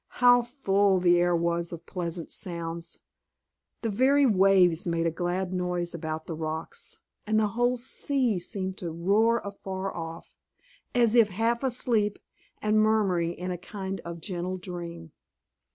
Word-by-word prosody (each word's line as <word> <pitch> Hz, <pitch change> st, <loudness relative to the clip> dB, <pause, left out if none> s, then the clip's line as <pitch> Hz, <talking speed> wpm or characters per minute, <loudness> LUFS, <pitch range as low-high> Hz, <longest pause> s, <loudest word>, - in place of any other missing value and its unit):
How 245 Hz, -1 st, +6 dB
full 200 Hz, -6 st, +2 dB
the 175 Hz, -1 st, +4 dB
air 175 Hz, 0 st, +3 dB
was 170 Hz, 0 st, 0 dB
of 170 Hz, -1 st, -8 dB
pleasant 170 Hz, -2 st, -5 dB
sounds! 170 Hz, -1 st, -4 dB, 0.8 s
The 225 Hz, -, 0 dB
very 270 Hz, +6 st, +4 dB
waves 190 Hz, -6 st, +4 dB
made 170 Hz, -1 st, 0 dB
a 165 Hz, -, +2 dB
glad 180 Hz, +2 st, -2 dB
noise 180 Hz, -1 st, -2 dB
about 160 Hz, -1 st, -4 dB
the 165 Hz, -, -5 dB
rocks, 160 Hz, 0 st, -4 dB, 0.3 s
and 215 Hz, 0 st, +3 dB
the 215 Hz, -1 st, +2 dB
whole 245 Hz, +3 st, +1 dB
sea 250 Hz, -3 st, 0 dB
seemed 190 Hz, +1 st, -4 dB
to 175 Hz, -, -4 dB
roar 205 Hz, +8 st, +2 dB
afar 195 Hz, -1 st, -5 dB
off, 165 Hz, -1 st, -7 dB, 0.6 s
as 235 Hz, -2 st, +4 dB
if 230 Hz, -3 st, +6 dB
half 225 Hz, +5 st, 0 dB
asleep 235 Hz, -5 st, +1 dB, 0.5 s
and 215 Hz, 0 st, +3 dB
murmuring 195 Hz, -6 st, +2 dB
in 180 Hz, +1 st, -5 dB
a 175 Hz, -, -4 dB
kind 190 Hz, +1 st, -5 dB
of 170 Hz, 0 st, -7 dB
gentle 185 Hz, 0 st, -3 dB
dream. 170 Hz, -3 st, -7 dB
185 Hz, 150 wpm, -27 LUFS, 170-215 Hz, 0.8 s, How